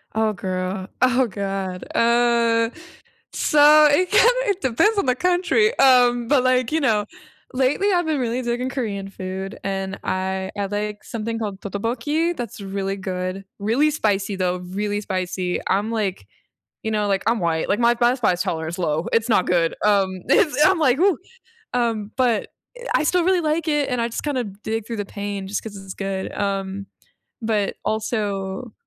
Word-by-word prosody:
Oh, 220 -1 +1
girl. 185 0 -3
Oh, 255 0 +3
god. 195 -2 -4
Uh. 235 -1 +3 0.6
So, 300 +1 +6
it 355 +5 +2
kinda 480 - +6 0.2
it 395 -2 0
depends 405 - +2
on 400 - +2
the 250 - +3
country. 360 - +2
Um, 245 -2 +5
but 270 +1 +3
like, 255 0 +2
you 320 - +2
know, 220 -7 +2 0.5
lately, 270 +11 +1
I've 350 -2 +1
been 310 -2 0
really 245 0 -1
digging 245 +1 -2
Korean 210 -7 -3
food, 190 +1 -6
and 195 0 -3
I 190 0 -2
I 200 -1 -1
like 210 +1 -4
something 225 0 -4
called 205 -3 -4
떡볶이, 245 - -1
that's 235 -5 -6
really 195 0 -3
good. 185 0 -4
Really 235 +9 +2
spicy, 205 -8 0
though, 180 -1 0
really 205 +3 -3
spicy, 185 -2 -2
I'm, 205 +3 +1
like, 210 -5 -2 0.6
you 220 - -2
know, 210 -1 0
like, 195 -1 +1
I'm 230 -1 +2
white, 165 -2 0
like, 200 - +1
my 235 0 +4
bice 240 +2 +2
spice 180 -7 +1
tolerance 160 0 -3
is - - -9
low, 160 -1 -1
it's 230 +1 +2
not 195 -4 +3
good, 170 -2 +2
um, 195 -3 +2
it's 295 -2 +3
I'm 380 +1 +3
like, 275 -4 +3
"Whoo." 370 -2 +3 0.6
um, 225 -4 -1
but, 245 -4 +1 0.5
I - - +2
still 355 +3 +2
really 370 -1 +3
like 315 +1 -1
it 295 -2 +1
and 250 -2 -1
I 230 - +1
just 235 - -5
kind 290 -3 -1
of 210 -4 -5
dig 225 0 -3
through 230 - -4
the 205 - -2
pain 200 -1 -5
just 200 - -3
'cause 220 -2 -8
it's 195 -1 -8
good, 195 -1 -4
um, 195 -1 -3 0.5
but, 215 -3 0
also 210 0 -2
220 Hz, 175 wpm, -22 LUFS, 195-255 Hz, 0.6 s, So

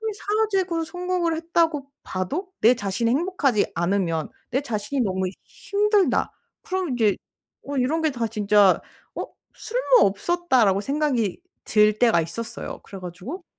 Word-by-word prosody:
왜 445 0 -2
사회적으로 390 -6 0
성공을 355 0 -1
했다고 325 -3 0 0.2
봐도 280 - -3
내 235 +3 +7
자신이 205 +2 -1
행복하지 285 - +1
않으면 170 -2 0 0.2
내 265 +4 0
자신이 245 +2 -2
너무 190 -2 -1 0.2
힘들다 410 -1 +1 0.3
그러면 370 -7 -2
이제 220 -5 +3 0.5
어 285 0 -4
이런 265 +6 +1
게 315 -1 +2
다 235 -3 -2
진짜 205 -2 +4 0.3
'어 - - -4 0.3
쓸모없었다.'라고 345 - +2
생각이 275 - -1 0.2
들 210 0 +3
때가 225 -9 +4
있었어요. 230 +9 -6
그래 195 - -9
가지고 185 - -7
260 Hz, 305 characters per minute, -24 LUFS, -, 0.5 s, 내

